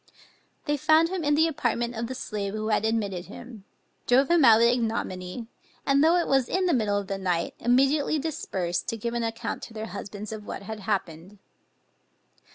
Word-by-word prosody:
They 295 0 0
found 315 +3 +4
him 370 -2 -3
in 290 0 +3
the 320 +2 +4
apartment 240 -6 -1
of 230 +1 -3
the 260 - -5
slave 205 -4 -4
who 215 0 -3
had 215 0 +1
admitted 200 -5 -1
him, 230 -1 -11 0.4
drove 265 +5 +4
him 340 -3 +5
out 225 -3 +8
with 230 +1 +5
ignominy, 225 -3 -3 0.4
and, 275 +1 +4
though 330 +2 +5
it 350 - +2
was 270 -3 +2
in 375 0 +1
the 350 - +2
middle 210 -5 +1
of 200 - -2
the 195 0 -4
night 180 -3 -1
immediately 275 +5 +2
dispersed, 190 - -3
to 230 - -2
give 235 +2 -3
an 235 - -1
account 225 0 -3
to 225 - -10
their 220 0 -4
husbands 205 +1 -7
of 215 -1 -6
what - - -6
had 220 +2 -6
happened. 190 -2 -3
230 Hz, 195 wpm, -26 LUFS, 205-275 Hz, 0.4 s, out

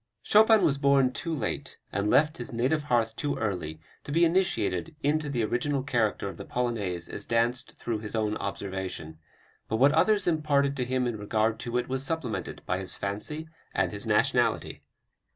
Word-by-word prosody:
Chopin 220 0 +6
was 140 -1 +2
born 140 -2 +4
too 165 - -4
late, 155 - -3
and 100 +1 0
left 150 +6 +3
his - - -5
native 130 +6 0
hearth 115 -4 +1
too 145 -1 -2
early, 90 -7 -3 0.2
to - - -7
be 170 +3 +4
initiated 165 - +1
into 150 +1 +1
the 120 -5 0
original 130 +5 0
character 115 -7 0
of 95 - -7
the - - -7
Polonaise 105 -8 -2
as - - -5
danced 115 +1 0
through 115 -2 -3
his 105 +1 -6
own 110 -1 0
observation. 95 -5 -5 0.5
But - - 0
what 135 +4 +6
others 200 +6 +3
imparted 145 -4 +2
to 125 - 0
him 130 0 0
in 120 -3 -2
regard 110 +2 0
to 120 +1 -2
it 125 - -1
was 130 +1 -2
supplemented 145 -6 -3
by 90 - -1
his 95 -1 -3
fancy 130 +11 -4 0.3
and - - +1
his - - -6
nationality." - - +1
125 Hz, 180 wpm, -28 LUFS, 105-145 Hz, 0.5 s, Chopin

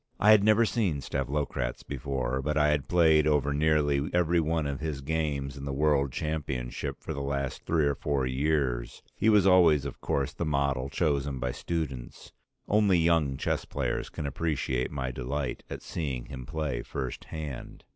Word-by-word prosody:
I 105 - +6
had 105 -2 +7
never 110 +2 +5
seen 100 -10 0
Stavlokratz 70 -2 -2
before, 65 -2 -2
but 75 +2 -1
I 75 0 +4
had 75 -2 0
played 80 -3 +4
over 70 -2 +2
nearly 75 -1 +2
every 85 -1 +3
one 80 -1 0
of 70 -1 -3
his 75 -3 -3
games 70 -2 -2
in 70 - -7
the 70 - -3
World 70 -1 +2
Championship 70 -6 -3
for - - -4
the 70 - -4
last 70 -1 -3
three 80 -3 +2
or 70 - +2
four 70 -1 -1
years; 65 -2 -1
he 110 - +2
was 105 -3 +5
always 85 -7 +5
of 70 - -7
course 70 +1 -1
the - - -3
model 70 -3 0
chosen 70 -3 0
by 65 0 -2
students. 70 -6 -5 0.4
Only 105 -3 +4
young 80 -5 +2
chess - - -1
players - - -2
can 75 - -5
appreciate 70 -4 -1
my 65 -3 -3
delight 65 +1 -3
at - - -6
seeing 70 -7 -3
him 65 -3 -8
play 75 -6 -2
first 65 -3 -5
hand. 75 -5 -7
70 Hz, 175 wpm, -28 LUFS, 70-80 Hz, 0.4 s, had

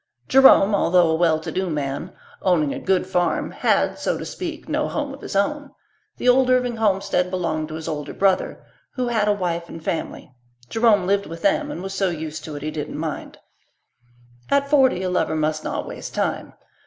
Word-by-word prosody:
Jerome, 265 -6 +6
although 175 -4 +3
a - - +2
well 160 -1 +2
to 160 - -6
do 185 -1 -2
man, 145 +3 -3 0.3
owning 160 -6 +2
a - - -5
good 190 -1 +1
farm, 175 -3 0
had, - - +1
so - - -1
to - - -6
speak, 335 -3 -6
no 300 -1 0
home 290 -2 -3
of 275 - -11
his - - -7
own. 285 +8 0 0.5
The - - -3
old 255 +1 +5
Irving 250 -2 +2
homestead 195 -4 +1
belonged 165 -4 -2
to 155 - -7
his 160 0 -6
older 150 -2 -4
brother, 195 -1 0 0.3
who 250 -2 -1
had 220 -3 +1
a - - +4
wife 170 -3 -3
and 165 - -9
family. 160 -5 -4 0.4
Jerome 225 -4 +3
lived 200 +1 +1
with 165 0 -9
them 300 0 +2
and 190 - -6
was 195 0 -5
so 195 -1 +1
used 160 -2 -5
to 155 - -7
it 145 - -7
he 155 - -3
didn't 150 -1 -5
mind. 155 -1 -5 1.1
At 280 0 +1
forty 260 -10 +4
a 185 - -1
lover 180 -3 0
must 155 0 -1
not - - -3
waste - - -8
time. - - -2
185 Hz, 200 wpm, -22 LUFS, 160-245 Hz, 1.1 s, Jerome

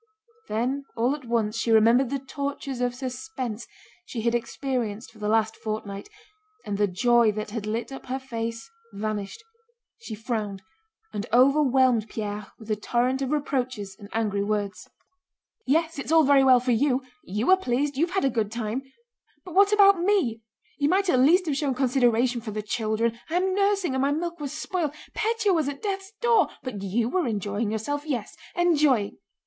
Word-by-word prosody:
Then 255 +6 -1
all 240 +4 +2
at 290 -3 -11
once 230 -1 0
she 230 - -1
remembered 230 +4 +5
the 275 - -1
tortures 275 -1 -5
of 245 0 0
suspense 255 -3 -5 0.4
she 240 -10 -5
had 235 +1 +1
experienced 240 -2 -3
for 220 - -18
the 210 - -3
last 220 0 +2
fortnight, 215 - -5 0.6
and 205 -1 -3
the 205 - +4
joy 235 +4 +3
that 215 0 -5
had 215 -2 -4
lit 230 +5 -3
up 270 - -9
her 260 +1 -2
face 230 -3 -5 0.3
vanished; 210 - -4 0.6
she 230 - -7
frowned 210 -3 -4 0.5
and 205 +2 -4
overwhelmed 260 -3 +4
Pierre 210 -2 -4
with 220 -1 -8
a - - +3
torrent 245 +5 0
of 270 - -1
reproaches 255 -9 -2
and 200 -1 -11
angry 210 -3 0
words. 205 -1 -3 0.8
"Yes, 320 +2 +1
it's 280 - -4
all 325 -1 +6
very 280 -1 +5
well 260 -2 +6
for 250 +1 -1
you. 260 +2 +2 0.2
You 210 - 0
are 380 - +7
pleased, 285 -3 -1
you've 340 +6 0
had 385 - +2
a - - +4
good 215 -3 -1
time.... 230 +2 -3 0.6
But 360 - -9
what 400 +2 +5
about 400 -3 +6
me? 345 - +1 0.4
You 285 0 +2
might 385 +2 +2
at 255 - +3
least 345 +8 +5
have 300 -4 0
shown 275 -3 0
consideration 245 -2 +2
for 225 - -6
the 215 0 -4
children. 225 +2 -1
I 330 - -2
am 375 +1 +2
nursing 395 -5 +1
and 265 - 0
my 275 +1 +2
milk 340 +2 -3
was 285 -2 -4
spoiled.... 310 -1 -2 0.2
Pétya 440 -2 +1
was 315 -5 +1
at 280 -1 -8
death's 390 -1 -3
door. 475 -1 +4 0.2
But 235 -7 -5
you 210 +4 0
were 345 +3 0
enjoying 205 0 -2
yourself. 285 +7 -2
Yes, 255 -9 -3 0.2
enjoying..." 300 - +2
250 Hz, 180 wpm, -26 LUFS, 220-290 Hz, 0.8 s, are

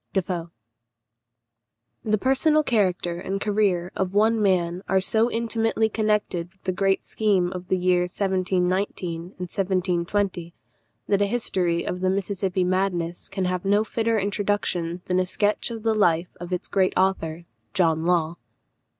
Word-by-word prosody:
Defoe. 175 -3 -2 1.5
The 215 -1 +1
personal 300 +6 +3
character 180 -8 0
and 195 +2 -3
career 200 -4 +1
of 190 0 -2
one 220 +2 +3
man 180 -3 +1
are 190 - +4
so 220 +5 +3
intimately 225 -1 0
connected 210 -6 -1
with 190 0 -35
the 185 - 0
great 195 +1 +1
scheme 195 -5 +1
of 180 -1 -7
the 185 - +1
years 180 -1 +2
1719 185 -2 0
and 175 - -11
1720, 180 -1 -1 0.5
that 200 -1 +2
a 200 - +3
history 180 -7 0
of 180 - -3
the 185 0 +1
Mississippi 190 -1 -1
madness 180 -2 -1
can 195 -1 -2
have 180 -1 -1
no 205 +2 +3
fitter 225 0 0
introduction 195 -4 -1
than 180 0 +1
a 185 - +1
sketch 205 +5 0
of 225 -2 -6
the 225 -1 +2
life 175 -5 +1
of 175 +1 -7
its 180 +1 -2
great 190 -2 +1
author 170 -3 0 0.3
John 160 -3 +2
Law. 170 -1 +1
190 Hz, 150 wpm, -24 LUFS, 175-205 Hz, 1.5 s, are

